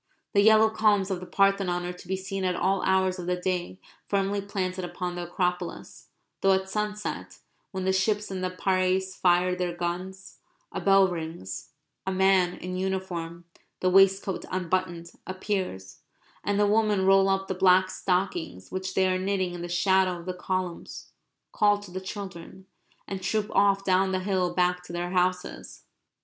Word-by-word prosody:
The 200 - +5
yellow 220 +1 +6
columns 210 -3 +2
of 185 - -1
the 185 - -9
Parthenon 195 -3 +2
are 180 - -4
to 180 0 -14
be 190 - -1
seen 190 0 -4
at 180 -1 +1
all 190 +1 +1
hours 190 -1 +1
of 175 - -6
the 180 - +1
day 180 0 -3 0.3
firmly 200 0 0
planted 190 -2 -3
upon 175 0 -4
the 175 0 -5
Acropolis; 180 0 -3 0.3
though 195 0 +5
at 190 0 0
sunset, 210 +1 -4 0.3
when 190 -1 -4
the 190 - +2
ships 205 +2 0
in 190 -1 -4
the 185 - -1
Piraeus 185 0 0
fire 180 0 +3
their 180 -1 -2
guns, 180 +2 -5 0.3
a - - -4
bell 195 -1 +5
rings, 160 - -6 0.4
a - - +1
man 190 -1 +3
in 180 0 -5
uniform 180 -3 -3 0.3
(the 185 - +1
waistcoat 195 0 +4
unbuttoned) 180 -2 -2 0.2
appears; 185 - -4 0.4
and 205 0 0
the 210 - +4
women 210 -2 +2
roll 195 0 +5
up 195 0 0
the - - -1
black 185 0 +4
stockings 180 - -2
which 190 0 -4
they 190 0 +3
are 185 0 +1
knitting 190 -1 -1
in 175 - -6
the 175 - -5
shadow 185 0 +2
of 170 - -11
the 185 - -3
columns, 180 -1 -4 0.4
call 205 -1 +3
to 205 -3 -12
the 185 +1 -5
children, 190 -1 -8 0.4
and 195 -1 -5
troop 210 +3 -1
off 200 0 +3
down 190 0 +3
the 185 0 -1
hill 185 -2 0
back 180 0 +1
to 180 - -11
their 175 +1 -3
houses. 180 0 -2
185 Hz, 175 wpm, -27 LUFS, 180-195 Hz, 0.4 s, yellow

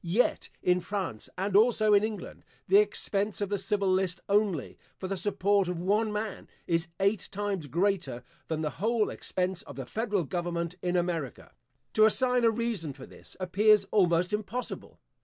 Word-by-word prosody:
Yet, 185 +8 +1
in 180 0 +3
France, 185 - -4
and 195 +1 -1
also 215 0 +5
in 205 0 +5
England, 215 -1 -5 0.2
the 395 - +6
expense 205 - 0
of 205 -2 -2
the 205 -1 -1
civil 200 +1 0
list 185 -1 +1
only, 200 -8 0 0.2
for 190 - -5
the 195 - -2
support 200 +1 +1
of 180 -1 -2
one 210 +5 +1
man, 210 -1 -4 0.2
is 165 0 0
eight 200 +1 +1
times 200 -5 -3
greater 175 -4 0 0.2
than 160 -1 -2
the 150 -2 -1
whole 225 0 +1
expense 185 0 -2
of 220 - -11
the - - -5
federal 210 -4 -1
government 170 +1 -3
in 180 0 -1
America. 170 -7 -2 0.4
To 215 - +6
assign 250 +2 +3
a 230 - +6
reason 225 -9 -2
for 135 -1 -11
this, - - -15
appears 200 +3 +4
almost 180 -1 +3
impossible. 215 +4 -4
195 Hz, 170 wpm, -29 LUFS, 175-215 Hz, 0.4 s, the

